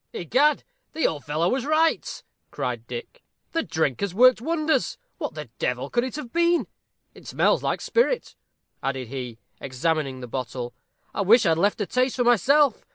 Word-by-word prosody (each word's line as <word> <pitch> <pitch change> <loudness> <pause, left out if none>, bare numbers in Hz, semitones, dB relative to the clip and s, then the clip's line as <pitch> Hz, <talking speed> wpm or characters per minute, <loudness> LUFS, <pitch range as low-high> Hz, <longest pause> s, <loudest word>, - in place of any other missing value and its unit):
"Egad, 275 - +2 0.3
the 320 - 0
old 150 -3 -1
fellow 155 +3 0
was 255 +6 0
right," 310 +3 +1 0.3
cried - - -4
Dick. 485 +1 -8 0.3
"The 330 - 0
drink 160 - -1
has 200 -3 -2
worked 255 +1 +6
wonders. 315 +2 0 0.2
What - - -4
the - - -8
devil - - -2
could 240 - +2
it 255 - -4
have 290 -6 -7
been? 340 0 +3 0.5
It - - -15
smells - - +2
like - - -1
spirit," 485 +1 0 0.5
added 130 -3 -3
he, 125 -3 -6 0.2
examining 135 0 -1
the 125 - -7
bottle. 125 0 -5 0.4
"I - - -1
wish 220 +4 +5
I'd 165 -2 +3
left 205 +4 +1
a - - +1
taste 255 +5 0
for 250 - +1
myself. 250 - +4
225 Hz, 170 wpm, -24 LUFS, -, 0.5 s, worked